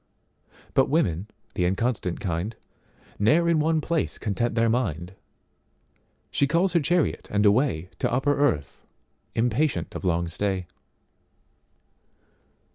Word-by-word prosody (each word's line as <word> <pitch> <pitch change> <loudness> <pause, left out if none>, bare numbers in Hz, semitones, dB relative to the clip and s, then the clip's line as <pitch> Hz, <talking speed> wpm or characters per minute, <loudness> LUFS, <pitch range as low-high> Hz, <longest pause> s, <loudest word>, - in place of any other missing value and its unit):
But 135 - +3
women, 100 - +1 0.3
the 90 - 0
inconstant 95 -1 -1
kind, 95 +4 -3 0.6
Ne'er 155 +12 +4
in 165 -2 +3
one 160 +1 +2
place 165 +1 -1
content 110 +2 -1
their 115 -1 +3
mind, 95 - -1 1.2
She 140 - +2
calls 170 +5 +2
her 170 - +4
chariot 175 +1 0
and 105 0 +1
awayTo 100 - +1
upper 135 +4 +2
earth—impatient 120 - -2
of - - -6
long 85 -1 +1
stay. 95 +2 -2
115 Hz, 110 wpm, -25 LUFS, 95-145 Hz, 1.2 s, Ne'er